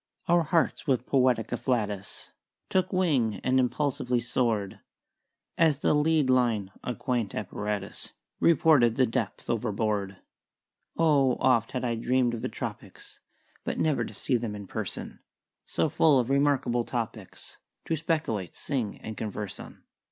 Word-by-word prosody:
"Our 175 0 +4
hearts 165 0 0
with 130 -3 +1
poetic 125 -4 +2
afflatus 105 -6 -2 0.4
Took 185 0 +1
wing 145 - +2
and 130 0 +3
impulsively 125 -1 0
soared 115 -4 -1 0.8
As 160 -4 +4
the 150 - +2
lead 150 -1 +3
line 120 -6 +2
(a 125 - -3
quaint 120 -5 -2
apparatus) 105 0 -4 0.3
Reported 150 -8 +4
the 130 - +4
depth 115 -4 -3
overboard. 105 -3 -1 0.8
"Oh, 140 -6 +3
oft 120 -4 +2
had 125 -1 -2
I 120 - 0
dream'd 120 +1 +1
of 115 - -4
the - - -2
tropics - - -8 0.4
But - - -3
never 155 -3 +1
to - - -7
see 130 - +1
them 115 -3 -4
in 100 -1 -7
person - - -5 0.5
So - - +1
full 155 -4 +4
of 125 +1 +1
remarkable 135 -4 +2
topics 115 -5 -6 0.3
To 165 - 0
speculate, 155 - -2
sing, 125 -8 -3
and 110 - -6
converse 105 -2 -5
on." - - -11
125 Hz, 140 wpm, -28 LUFS, 110-140 Hz, 0.8 s, Our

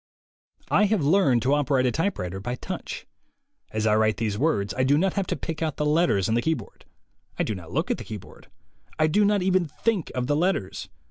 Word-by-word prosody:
I 210 - +5
have 205 -5 +1
learned 140 - +3
to 135 +3 +2
operate 135 -3 +2
a 125 - +2
typewriter 105 - -2
by 120 +5 -3
touch. 185 +8 -6 0.6
As 110 0 -2
I 105 -1 +4
write 110 0 +2
these 110 -3 -1
words, 105 -6 0
I 130 - 0
do 140 +2 +4
not 190 +3 +1
have 195 -3 -1
to - - -1
pick 160 -1 -5
out 155 -3 -1
the 150 - 0
letters 150 - +2
on 110 - 0
the 120 - +2
keyboard. 155 -9 -3 0.5
I - - +1
do 110 - -2
not 85 -5 -9
look - - 0
at - - -1
the - - -6
keyboard. 105 -4 -10 0.5
I 155 - +3
do 180 +7 +3
not 205 -2 +2
even 185 -2 +2
think 195 +4 -1
of 125 -1 -1
the 145 +3 +1
letters. 165 - -1
145 Hz, 220 wpm, -25 LUFS, 110-175 Hz, 0.6 s, I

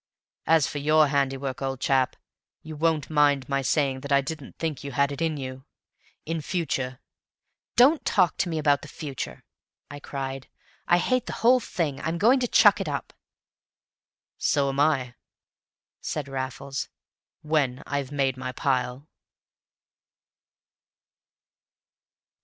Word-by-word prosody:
As 160 -3 +5
for 145 - -4
YOUR 155 +1 +4
handiwork, 135 -1 -1
old 135 -1 -2
chap, 130 -1 +1 0.5
you 155 0 -8
won't 160 -1 0
mind 145 -3 +3
my 140 -1 0
saying 135 -1 +1
that 140 +2 -8
I 140 - +6
didn't 140 0 -6
think 160 -4 -3
you 140 -1 -6
had 140 +2 +2
it 140 - -6
in 160 -2 0
you. 130 -1 -6 0.6
In 165 0 -2
future 135 -6 -2 0.4
" - - -57
"Don't 285 +6 +5
talk 185 -5 +2
to 175 - 0
me 160 - -2
about 145 -2 +2
the - - -10
future!" 145 -5 -6 0.5
I 145 - -7
cried. 135 -2 -5 0.4
"I 175 - +5
hate 255 +7 0
the - - -4
whole 255 +2 +7
thing! 160 - -3
I'm 165 +1 -2
going 235 +9 +4
to 245 - 0
chuck 210 -3 +5
it 180 - -3
up!" 140 - -4 1.3
"So 140 -2 +2
am 135 +1 -3
I," 140 -5 +2 0.9
said 150 -3 -4
Raffles, 135 0 -4 0.5
"when 145 -5 0
I've 140 -2 -3
made 135 -3 0
my 130 0 -5
pile." 130 +1 -1
145 Hz, 140 wpm, -26 LUFS, 135-160 Hz, 1.3 s, whole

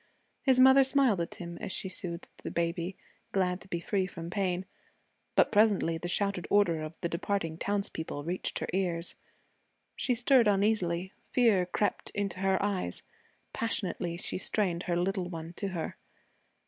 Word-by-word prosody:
His 260 -2 +4
mother 265 +1 +8
smiled 260 -8 +3
at 170 - -4
him 170 -1 -7
as - - -4
she 190 - -2
soothed 175 -2 -5
the - - -6
baby, 170 +2 -2 0.4
glad 180 -1 +1
to - - -13
be 170 -2 -2
free 190 +2 0
from 170 -2 -7
pain. 185 -1 -1 0.7
But - - +5
presently 205 -6 +3
the 175 - -4
shouted 200 0 -1
order 175 -6 +3
of 155 +1 -7
the 170 - 0
departing 170 -1 -2
townspeople 195 -7 -2
reached 175 +4 -2
her - - -3
ears. 175 -3 +1 0.8
She 250 - 0
stirred 245 0 +4
uneasily. 195 -3 +1
Fear 215 -8 +3
crept 205 +3 -1
into 200 -2 -2
her 190 0 +2
eyes. 190 - -1 0.5
Passionately 180 -6 -2
she 180 - -2
strained 185 -3 0
her 170 - +2
little 185 0 0
one 165 -1 -6
to 200 - -2
her. 175 -4 -4
185 Hz, 160 wpm, -30 LUFS, 170-205 Hz, 0.8 s, mother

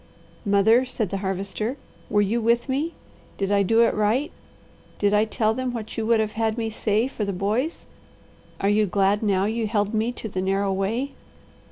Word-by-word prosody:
"Mother," 205 +5 +4
said 230 -6 -3
the 195 - -1
Harvester, 200 +6 -3 0.3
"were 205 0 +3
you 225 +4 0
with 235 +3 +2
me? 285 +5 -1 0.4
Did 195 0 -1
I 200 0 +4
do 225 +4 +4
it - - +3
right? 225 +9 +1 0.7
Did 205 0 +2
I 210 +1 +4
tell 220 0 +1
them 255 +1 -3
what 220 -2 -6
you 220 -1 -2
would 230 -1 +4
have 215 -1 0
had 220 0 -1
me 225 -1 -2
say 215 +2 +1
for 250 -5 -4
the 200 - -1
boys? 215 - -1 0.7
Are 195 - 0
you 210 +1 +3
glad 195 +2 +2
now 195 -3 +2
you 220 +1 -1
held 205 0 0
me 220 +2 +1
to 225 - -6
the 185 -3 -3
narrow 195 +1 0
way? 225 +9 -1
215 Hz, 195 wpm, -24 LUFS, 200-230 Hz, 0.7 s, Mother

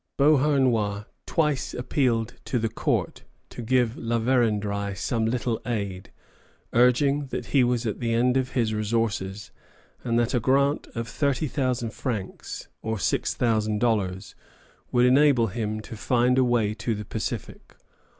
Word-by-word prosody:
Beauharnois 130 -8 +3 0.2
twice 150 -4 0
appealed 120 -3 0
to 125 - -1
the 115 -1 0
court 110 - -1 0.3
to - - -7
give 120 0 +1
La 115 0 -1
Vérendrye 105 -5 0
some 110 +3 0
little 120 -1 -1
aid, 100 -6 -4 0.6
urging 135 +4 +3
that - - -4
he 135 -3 +5
was 120 -1 0
at 110 - -2
the 115 -1 -1
end 125 +2 +2
of 130 -1 0
his 115 -4 +1
resources, 105 -2 -2 0.5
and 115 -2 0
that 120 +1 +1
a 125 - +3
grant 140 +4 +2
of 115 0 -3
30,000 130 -3 -1
francs, 110 -8 -5
or 110 0 -2
6,000 110 +2 0
dollars, 100 -5 -1 0.6
would 125 0 +4
enable 130 -3 +4
him 110 +1 -3
to 115 - -9
find 125 +3 +2
a - - +5
way 120 -4 +1
to 115 +1 -2
the 105 0 -6
Pacific. - - -5
120 Hz, 140 wpm, -25 LUFS, 110-130 Hz, 0.6 s, he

